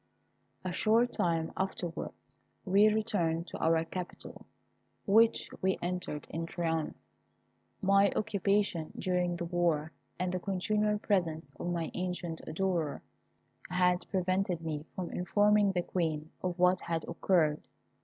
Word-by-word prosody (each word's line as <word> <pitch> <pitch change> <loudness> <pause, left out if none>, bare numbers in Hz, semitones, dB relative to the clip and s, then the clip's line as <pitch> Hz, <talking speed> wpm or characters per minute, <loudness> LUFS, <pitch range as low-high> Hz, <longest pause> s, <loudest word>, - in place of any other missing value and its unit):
A 180 - -2
short 225 +5 +3
time 165 -2 0
afterwards 185 -3 -5 0.3
we 200 +2 +5
returned 190 -7 0
to - - -7
our 160 0 +3
capital, 180 +1 -7 0.6
which 225 +3 +4
we 190 0 +2
entered 175 -4 -3
in 165 +1 -3
triumph. 165 -2 -1 0.9
My 195 +1 +5
occupation 200 -5 0
during 180 -1 0
the 170 0 -3
war, 165 -3 +1 0.3
and 180 0 -1
the 185 - -1
continual 210 +3 0
presence 165 -8 0
of 175 - -2
my 170 -2 -2
ancient 180 -2 -3
adorer, 165 -2 -1 0.7
had 180 0 +2
prevented 185 -2 0
me 155 -2 -4
from 180 -2 -4
informing 205 +2 +3
the 180 -2 0
Queen 160 -4 -2
of 180 -1 -2
what 180 +1 +4
had 165 -1 -2
occurred. 165 -3 +2
180 Hz, 125 wpm, -31 LUFS, 165-195 Hz, 0.9 s, we